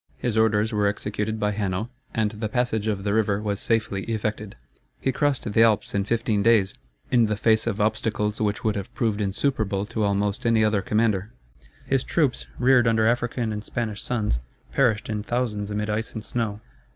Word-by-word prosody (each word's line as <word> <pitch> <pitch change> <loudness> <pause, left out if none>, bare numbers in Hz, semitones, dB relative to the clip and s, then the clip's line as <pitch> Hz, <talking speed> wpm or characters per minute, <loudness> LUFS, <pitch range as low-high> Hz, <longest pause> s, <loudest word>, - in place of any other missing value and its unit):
His 120 -3 -2
orders 110 0 +2
were 105 -1 +2
executed 105 +1 -2
by 105 0 +1
Hanno, 100 +2 -2 0.2
and 110 -2 0
the 110 0 -4
passage 110 -2 0
of 100 -3 -1
the 100 0 0
river 105 -2 +2
was 105 -1 -2
safely 110 -4 0
effected. 110 -2 -3 0.4
He 135 - 0
crossed 145 +1 0
the 110 - +5
Alps 110 -3 +3
in 100 -1 0
fifteen 110 -1 0
days, 105 -4 +4 0.4
in 120 -3 +4
the 105 -1 -1
face 110 +1 +2
of 110 -3 -1
obstacles 105 0 0
which 105 -1 0
would 110 -2 +1
have 100 -1 -5
proved 110 -3 0
insuperable 100 -1 0
to 110 +1 -4
almost 100 0 0
any 115 -2 +3
other 105 -2 +2
commander. 105 -1 +1 0.6
His 135 -1 +1
troops, 150 -7 0
reared 125 -1 +4
under 110 -1 +3
African 120 -1 0
and 105 0 -5
Spanish 110 -4 -3
suns, 105 - -1 0.3
perished 115 -7 +2
in 110 -1 -2
thousands 105 -3 -2
amid 105 0 -2
ice 110 +2 -2
and 110 -1 -5
snow. 110 -3 -2
110 Hz, 185 wpm, -25 LUFS, 105-115 Hz, 0.6 s, the